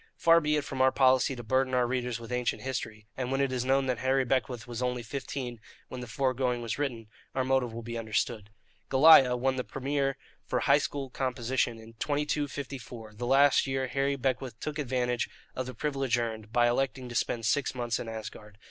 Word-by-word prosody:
Far 165 Hz, 0 st, +5 dB
be 150 Hz, 0 st, +1 dB
it 150 Hz, -, 0 dB
from 135 Hz, -2 st, -3 dB
our 130 Hz, 0 st, +5 dB
policy 130 Hz, 0 st, +3 dB
to 120 Hz, -, -7 dB
burden 130 Hz, +2 st, +1 dB
our 125 Hz, -1 st, +3 dB
readers 125 Hz, -1 st, -2 dB
with 115 Hz, +1 st, -9 dB
ancient 125 Hz, -1 st, -1 dB
history; 110 Hz, -5 st, -4 dB
and 130 Hz, -1 st, -3 dB
when 135 Hz, -, 0 dB
it 140 Hz, -1 st, +1 dB
is 125 Hz, -2 st, -1 dB
known 135 Hz, +1 st, +2 dB
that 125 Hz, -2 st, -1 dB
Harry 130 Hz, +1 st, +2 dB
Beckwith 125 Hz, -2 st, -1 dB
was 120 Hz, 0 st, -6 dB
only 125 Hz, -1 st, -1 dB
fifteen 125 Hz, -1 st, -5 dB, 0.3 s
when 125 Hz, -, -6 dB
the 125 Hz, -, -7 dB
fore 130 Hz, +3 st, 0 dB
going 125 Hz, -2 st, -1 dB
was 115 Hz, +3 st, -3 dB
written, 125 Hz, -6 st, -2 dB, 0.3 s
our 130 Hz, -, +1 dB
motive 130 Hz, -2 st, +1 dB
will 115 Hz, +1 st, -7 dB
be 115 Hz, 0 st, -4 dB
understood. 110 Hz, -1 st, -2 dB, 0.4 s
"Goliah" 135 Hz, -3 st, +7 dB
won 130 Hz, +1 st, 0 dB
the 125 Hz, -, -1 dB
Premier 135 Hz, +1 st, -1 dB, 0.3 s
for -, -, 0 dB
high 140 Hz, +1 st, +5 dB
school 140 Hz, -2 st, -4 dB
composition 125 Hz, -2 st, -1 dB
in 110 Hz, 0 st, -13 dB
2254, 140 Hz, -5 st, -3 dB
and 105 Hz, +2 st, -16 dB
last 135 Hz, +3 st, +4 dB
year 135 Hz, 0 st, 0 dB
Harry 140 Hz, +1 st, 0 dB
Beckwith 130 Hz, -3 st, -2 dB
took 150 Hz, 0 st, -4 dB
advantage 125 Hz, -3 st, -1 dB, 0.3 s
of 130 Hz, -1 st, -3 dB
the 130 Hz, -, -7 dB
privilege 135 Hz, -2 st, 0 dB
earned, 110 Hz, -2 st, -4 dB
by 120 Hz, 0 st, +4 dB
electing 130 Hz, +1 st, -1 dB
to 120 Hz, -, -8 dB
spend 115 Hz, -1 st, -1 dB
six 140 Hz, +4 st, +1 dB
months 120 Hz, -1 st, -1 dB
in 115 Hz, -, -5 dB
Asgard. 105 Hz, -2 st, -8 dB
130 Hz, 205 wpm, -29 LUFS, 120-135 Hz, 0.4 s, Goliah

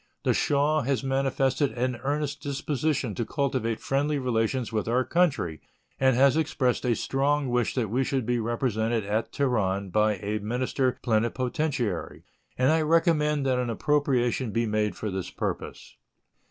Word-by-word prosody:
The -, -, +2 dB
Shah 150 Hz, +2 st, +2 dB
has 135 Hz, +1 st, -1 dB
manifested 135 Hz, +1 st, +1 dB
an 125 Hz, 0 st, -1 dB
earnest 140 Hz, +2 st, -2 dB
disposition 140 Hz, -3 st, -1 dB
to 115 Hz, -, -2 dB
cultivate 125 Hz, -4 st, -1 dB
friendly 145 Hz, +2 st, 0 dB
relations 125 Hz, -1 st, -1 dB
with 110 Hz, -1 st, -1 dB
our 125 Hz, +2 st, +1 dB
country, 140 Hz, -, +1 dB, 0.4 s
and 130 Hz, -2 st, +4 dB
has 135 Hz, +2 st, +5 dB
expressed 135 Hz, -5 st, 0 dB
a 120 Hz, -2 st, +2 dB
strong 140 Hz, +2 st, 0 dB
wish 120 Hz, -1 st, 0 dB
that 125 Hz, -4 st, 0 dB
we 130 Hz, +3 st, +1 dB
should 130 Hz, -2 st, -1 dB
be 120 Hz, +1 st, 0 dB
represented 115 Hz, -1 st, -1 dB
at 105 Hz, +3 st, -1 dB
Teheran 100 Hz, -8 st, 0 dB
by 105 Hz, +1 st, +3 dB
a 105 Hz, +2 st, -3 dB
minister 125 Hz, +4 st, -1 dB
plenipotentiary; 120 Hz, -, -1 dB, 0.3 s
and 130 Hz, +3 st, +3 dB
I 160 Hz, 0 st, +3 dB
recommend 150 Hz, -2 st, +2 dB
that 130 Hz, -1 st, +2 dB
an 125 Hz, -1 st, -1 dB
appropriation 130 Hz, -1 st, +1 dB
be 115 Hz, +2 st, 0 dB
made 105 Hz, -1 st, 0 dB
for 105 Hz, -, -4 dB
this 95 Hz, -1 st, -4 dB
purpose. -, -, -5 dB
130 Hz, 155 wpm, -27 LUFS, 115-140 Hz, 0.4 s, has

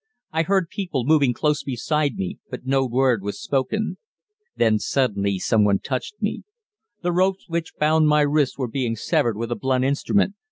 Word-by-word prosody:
I 160 Hz, -, +1 dB
heard 185 Hz, 0 st, +1 dB
people 175 Hz, -10 st, -3 dB
moving 145 Hz, -3 st, +4 dB
close 150 Hz, +4 st, 0 dB
beside 145 Hz, +2 st, -1 dB
me, 95 Hz, -2 st, -4 dB
but -, -, -7 dB
no 135 Hz, 0 st, +2 dB
word 125 Hz, -2 st, +2 dB
was 100 Hz, +1 st, -5 dB
spoken. 145 Hz, +11 st, -1 dB, 0.6 s
Then 110 Hz, -1 st, +3 dB
suddenly 100 Hz, -7 st, 0 dB
someone 105 Hz, +1 st, +3 dB
touched 130 Hz, -, -4 dB
me. 210 Hz, -2 st, -2 dB, 0.6 s
The 175 Hz, -, +1 dB
ropes 185 Hz, +2 st, +1 dB
which 165 Hz, -1 st, -3 dB
bound 155 Hz, +1 st, +3 dB
my 150 Hz, 0 st, +4 dB
wrists 145 Hz, -2 st, +1 dB
were 130 Hz, -3 st, -2 dB
being 120 Hz, -1 st, -2 dB
severed 115 Hz, 0 st, 0 dB
with 115 Hz, +1 st, -4 dB
a -, -, +1 dB
blunt 130 Hz, 0 st, 0 dB
instrument. 190 Hz, +8 st, +1 dB
135 Hz, 170 wpm, -23 LUFS, 120-160 Hz, 0.6 s, moving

